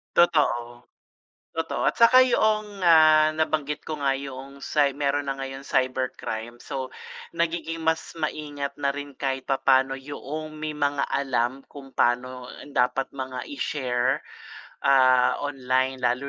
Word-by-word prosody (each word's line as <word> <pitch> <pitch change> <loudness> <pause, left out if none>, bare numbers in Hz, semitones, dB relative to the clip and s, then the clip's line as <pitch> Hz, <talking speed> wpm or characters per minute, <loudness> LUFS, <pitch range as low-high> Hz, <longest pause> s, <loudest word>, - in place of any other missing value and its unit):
Totoo. 120 -8 +2 0.7
Totoo 165 0 -1
at - - -6
saka 235 +2 +7
'yong 215 -5 +1
nga 155 -2 +6
nabanggit 150 -2 -1
ko 155 -1 -3
nga 140 -1 +1
'yong 135 0 -7
cy 145 -1 +2
meron 145 0 0
na 135 - -1
ngayong 135 0 -6
cybercrime, 125 -3 -2
so 135 -2 -5 0.4
nagiging 165 -1 -2
mas 160 0 0
maingat 145 -2 -4
na 140 -1 0
rin 145 -1 -7
kahit 135 -1 -2
papa'no 135 0 +3
'yong 145 +3 -6
may 155 0 -5
mga 145 -1 0
alam 135 -1 -1
kung 140 -2 -12
pa'no 125 +1 0 0.3
dapat 125 +2 +1
mga 130 -2 -5 0.2
i-share, 125 -4 0 0.7
ah, 130 -2 +5
online 130 -2 -1
lalo 125 +3 +1
140 Hz, 130 wpm, -25 LUFS, 130-155 Hz, 0.7 s, saka